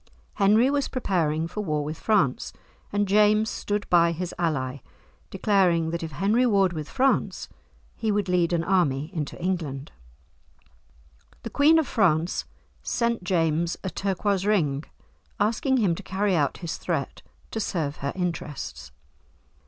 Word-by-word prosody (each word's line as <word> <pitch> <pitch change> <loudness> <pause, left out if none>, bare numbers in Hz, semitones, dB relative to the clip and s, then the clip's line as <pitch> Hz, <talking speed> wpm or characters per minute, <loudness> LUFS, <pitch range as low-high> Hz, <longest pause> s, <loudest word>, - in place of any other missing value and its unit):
Henry 215 +6 +4
was 285 -1 0
preparing 165 - 0
for 210 - -5
war 150 -6 -1
with 155 +2 -5
France, 175 - +1 0.4
and 205 0 +1
James 210 +2 +4
stood 205 0 -3
by 170 -1 +4
his 175 +1 -4
ally, 140 -6 -1 0.5
declaring 175 -6 +2
that 170 - -3
if 160 -2 -6
Henry 205 - +2
warred 195 -7 +3
with 155 -2 -5
France, 270 +1 0 0.5
he 220 -2 -1
would 205 -1 0
lead 180 -2 +2
an 170 -1 +1
army 155 -5 +1
into 150 -5 -4
England. 160 -7 -3 1.5
The - - -6
Queen 305 +3 +5
of 320 - +2
France 170 -6 +1 0.4
sent 235 -4 -1
James 165 -2 0
a 190 - -3
turquoise 195 0 -1
ring, 160 -9 +1 0.5
asking 230 +6 +1
him 200 -8 +2
to 165 - -6
carry 195 0 0
out 145 -4 +1
his 165 - -3
threat - - -3 0.3
to 225 - -3
serve 160 -8 -2
her 140 +1 -3
interests. 160 - -4
180 Hz, 145 wpm, -25 LUFS, 160-210 Hz, 1.5 s, Queen